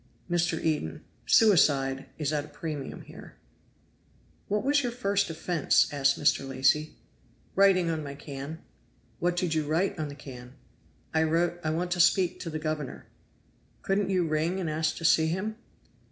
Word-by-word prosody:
Mr. 175 -2 0
Eden. 150 - -2 0.2
"Suicide 140 -10 +4
is 150 -1 -1
at 150 -1 0
a - - -11
premium 150 -2 -6
here." - - -13 1.1
"What 210 +1 0
was 285 +2 +3
your 245 -3 -2
first 200 -5 0
offense?" 165 -1 +2
asked 140 -1 +2
Mr. 140 -2 +2
Lacy. 135 +4 +1 0.6
"Writing 190 -3 +4
on 160 -1 -3
my 140 -1 -7
can." 140 +2 -8 0.6
"What 175 +1 0
did 175 -2 0
you 155 -1 +1
write 165 +3 0
on 155 - -2
the 145 - -8
can?" 125 -3 -11 0.6
"I 160 - +3
wrote, 170 +2 +1
'I 155 - 0
want 175 +3 -2
to 175 - -1
speak 180 +1 +3
to 165 - -5
the 155 - -4
governor.'" 155 -3 -4 0.8
"Couldn't 195 0 0
you 185 -3 +2
ring 160 +4 0
and 165 -4 -2
ask 155 +1 0
to 165 - -6
see 160 0 +5
him?" 190 +6 -2
160 Hz, 165 wpm, -28 LUFS, 150-180 Hz, 1.1 s, see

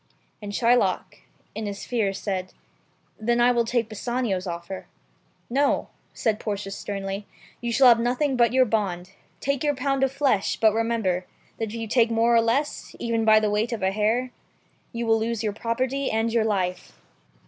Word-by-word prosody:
And 205 -1 -6
Shylock, 240 +3 +1 0.3
in 220 -1 -4
his 200 -1 -6
fear, 225 -5 0
said, 190 -2 -4 0.7
"Then 235 +2 +1
I 240 +1 +5
will 235 -1 +2
take 235 -1 0
Bassanio's 215 -3 -2
of 170 0 -5
fer." 190 +1 -7 0.6
"No," 275 +4 +1 0.2
said 220 -2 -1
Portia 200 -2 -4
sternly, 195 0 -5 0.3
"you 240 0 -2
shall 260 +2 +6
have 235 -1 +7
nothing 255 +4 +1
but 235 -2 +4
your 260 0 +4
bond. 190 -5 -2 0.3
Take 280 0 -1
your 295 -1 +1
pound 275 0 0
of 265 - +2
flesh, 270 -8 +1
but 220 -2 +5
remember, 225 -6 0 0.3
that 225 - 0
if 220 +1 -7
you 225 -1 -4
take 230 +1 +3
more 230 +1 +3
or 230 - +6
less, 260 +6 -1
even 230 -1 -1
by 215 0 +7
the 215 -1 0
weight 215 +4 0
of 220 -4 -3
a 190 - +2
hair, 220 +5 0 0.6
you 235 -1 -3
will 225 0 +3
lose 230 0 -2
your 210 -2 -1
property 255 +5 -1
and 225 +1 0
your 230 -2 +2
life." 185 - -2
225 Hz, 180 wpm, -25 LUFS, 205-240 Hz, 0.7 s, have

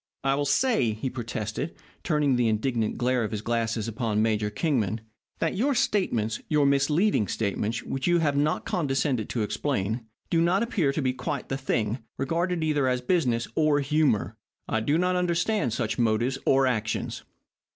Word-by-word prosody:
"I 135 0 +2
will 145 +1 0
say," 140 - +2
he 120 +5 -4
protested, 120 +3 -4 0.3
turning 150 -5 +2
the 120 -1 +2
indignant 110 0 0
glare 125 -1 +1
of 110 - -2
his 105 -1 -4
glasses 115 -1 -1
upon 115 -2 -1
Major 105 -2 +1
Kingman, 110 - 0 0.4
"that 165 - -1
your 265 +7 +1
statements 115 - 0
your 150 -2 +3
misleading 140 - +2
statements, 110 +3 -2
which 135 +3 -3
you 175 0 +4
have 150 -4 +1
not 150 +2 +1
condescended 135 - 0
to 115 - -1
explain 110 0 -2 0.2
do 165 - +3
not 180 +5 +3
appear 185 -11 +1
to 140 +1 -2
be 130 -1 +1
quite 125 0 -4
the 135 - -1
thing, 115 -3 -1 0.2
regarded 170 +4 -1
either 150 -4 +1
as 125 -1 +1
business 125 -5 +1
or 155 -2 +3
humour. 140 - +1 0.3
I 110 - 0
do 140 +8 +1
not 180 +1 +1
understand 180 - +1
such 110 -1 -2
motives 120 +3 +1
or 135 0 +5
actions." 110 -4 -1
130 Hz, 170 wpm, -26 LUFS, 110-155 Hz, 0.4 s, or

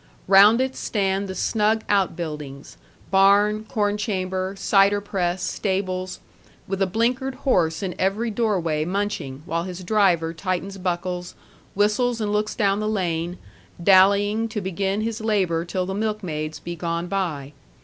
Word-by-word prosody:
Round 200 +4 +7
it 260 0 -1
stand 195 -1 -1
the 190 - -6
snug 220 +3 +1
out 195 -4 +2
buildings, 150 -5 -7 0.4
barn, 205 +2 +4
corn 210 -1 0
chamber, 190 -2 -2
cider 200 +1 +3
press, 185 -3 -2
stables, 185 -2 -2 0.5
with 195 0 -3
a 195 - +3
blinker'd 250 +6 0
horse 170 -8 +2
in 185 -2 -2
every 210 +5 0
doorway 185 -9 0
munching, 175 -7 -3
while 165 0 -1
his 185 0 -7
driver 175 -5 +2
tightens 185 +3 -3
buckles, 180 0 -3 0.4
whistles 220 +4 +1
and 210 -1 -1
looks 210 0 -1
down 200 -2 +1
the 215 0 -1
lane, 175 -4 -2 0.5
dallying 200 +4 +4
to 220 -1 -4
begin 195 +2 -2
his 225 0 -3
labour 190 -7 +1
till 185 +1 -2
the 190 - -4
milkmaids 180 -8 -3
be 170 - -6
gone 170 0 -3
by. 165 -7 -3
195 Hz, 145 wpm, -23 LUFS, 175-210 Hz, 0.5 s, Round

